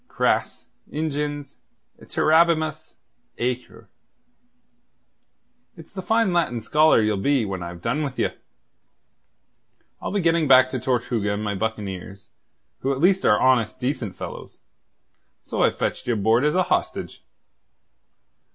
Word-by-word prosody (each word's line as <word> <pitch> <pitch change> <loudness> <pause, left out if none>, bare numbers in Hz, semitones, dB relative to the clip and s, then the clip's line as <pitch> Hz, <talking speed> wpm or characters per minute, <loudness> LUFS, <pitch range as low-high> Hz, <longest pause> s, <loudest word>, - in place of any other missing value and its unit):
Cras - - -1 0.3
ingens 145 -2 -3 0.4
iterabimus 155 -1 +1 0.4
aequor. 125 +1 -4 1.9
It's 160 - -14
the 190 - -5
fine 220 0 +1
Latin 165 -9 0
scholar 150 +2 +4
ye'll 105 -1 +1
be 135 -1 +2
when 95 -2 -4
I've 85 0 -8
done 125 +6 0
with 135 -4 -4
ye. - - +1 1.7
I'll - - -3
be 205 - 0
getting 165 -3 +2
back 130 -1 +6
to 130 - -3
Tortuga 120 -4 -1
and 105 - -4
my 105 -1 -1
buccaneers, 100 -2 -5 0.5
who 135 - -1
at 135 - -2
least 185 +4 +3
are 105 - +4
honest, 125 -4 +2
decent 125 -6 -3
fellows. - - -9 0.8
So - - -3
I've - - +2
fetched - - -3
ye 120 - +2
aboard 110 +5 +2
as 150 - +1
a 185 - +3
hostage." - - -2
130 Hz, 130 wpm, -23 LUFS, 110-155 Hz, 1.9 s, back